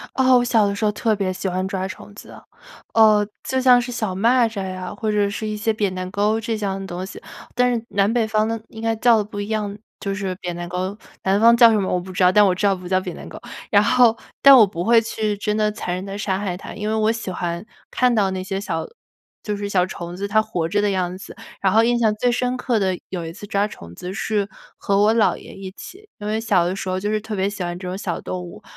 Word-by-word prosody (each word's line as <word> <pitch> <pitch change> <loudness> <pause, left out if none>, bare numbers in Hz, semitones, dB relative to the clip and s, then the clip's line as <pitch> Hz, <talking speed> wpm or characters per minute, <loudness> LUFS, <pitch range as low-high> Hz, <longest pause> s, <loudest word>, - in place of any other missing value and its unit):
哦， 260 -1 +5
我 245 - +1
小 225 -4 +3
的 200 - -1
时 210 +2 -3
候 210 - +3
特 220 +1 0
别 195 -2 -1
喜 190 +1 -3
欢 185 +1 -1
抓 190 -1 -2
虫 190 +2 -10
子。 - - -12 0.6
呃， 215 -2 +5 0.2
就 260 0 0
像 250 -1 +6
是 245 +1 -5
小 215 -5 -2
蚂 235 +5 +3
蚱 200 -4 -5
呀， 185 0 -5
或 220 0 -2
者 205 -1 +2
是 215 +2 -4
一 215 0 -3
些 220 +1 0
扁 205 -3 -1
担 185 0 -5
勾 210 +3 +1
这 225 0 -2
样 195 -2 -2
的 195 - -6
东 180 0 -5
西， 190 - -10 0.3
但 250 0 +3
是 230 -1 -3
南 200 +2 +2
北 235 -2 +1
方 215 0 +1
的 225 0 -2
应 220 - -10
该 225 0 +1
叫 235 +1 +5
的 210 - 0
不 205 0 -7
一 205 - -4
样， 210 -2 -2 0.2
就 195 -1 -2
是 195 -2 -3
扁 180 -2 -5
担 175 0 -6
勾， 185 +3 -3 0.3
南 195 +2 +2
方 235 +1 +7
叫 235 -1 +8
什 220 - +2
么 190 - -1
我 180 - +1
不 185 +1 -9
知 185 - -1
道， 180 - +5
但 210 +2 +6
我 190 -2 +3
知 195 +3 0
道 200 - +4
不 180 -1 -8
叫 185 0 +2
扁 - - -6
担 - - -9
勾。 - - -10 0.3
然 205 -1 +5
后， 240 0 +4 0.3
但 275 -1 +10
我 220 - +8
不 175 -2 -5
会 230 0 +5
去 215 -2 -2
真 210 +1 -1
的 215 -1 +2
残 210 -4 -4
忍 185 +1 -4
地 195 0 -6
杀 190 -2 -1
害 195 -3 -3
它， - - -9
因 210 0 -4
为 215 - 0
我 220 0 +2
喜 225 -4 -5
欢 175 0 -3 0.3
看 250 -1 +2
到 200 -4 +2
那 185 0 -3
些 195 +1 -3
小 165 -5 -3 0.6
就 210 -1 -3
是 205 0 -4
小 185 -3 +2
虫 175 -1 -7
子 200 +2 -3
它 215 +1 +3
活 180 -7 -2
着 205 +4 +1
的 205 - +2
样 185 -1 -1
子。 195 - -11 0.3
然 190 - +3
后 220 +2 +5
印 240 0 +2
象 220 -3 +2
最 245 +3 +1
深 250 +1 0
刻 245 -2 0
的 190 -3 0
有 180 -3 -4
一 165 - -6
次 205 +4 -10
抓 200 0 +1
虫 85 - -12
子 180 - -7
是 205 -1 -1 0.3
和 200 0 0
我 215 +2 +4
姥 225 -2 +3
爷 - - -12
一 195 -1 -8
起。 395 - -12
因 205 - -7
为 215 +1 -1
小 180 -6 +2
的 185 +2 -2
时 190 - -5
候 185 - -1
就 205 +2 -2
是 215 0 0
特 220 0 -6
别 190 0 0
喜 205 -1 -5
欢 175 0 -4
这 180 0 -6
种 185 - -4
小 185 -3 -3
动 180 -1 -5
物， 175 - -11
205 Hz, 300 characters per minute, -21 LUFS, 185-220 Hz, 0.6 s, 但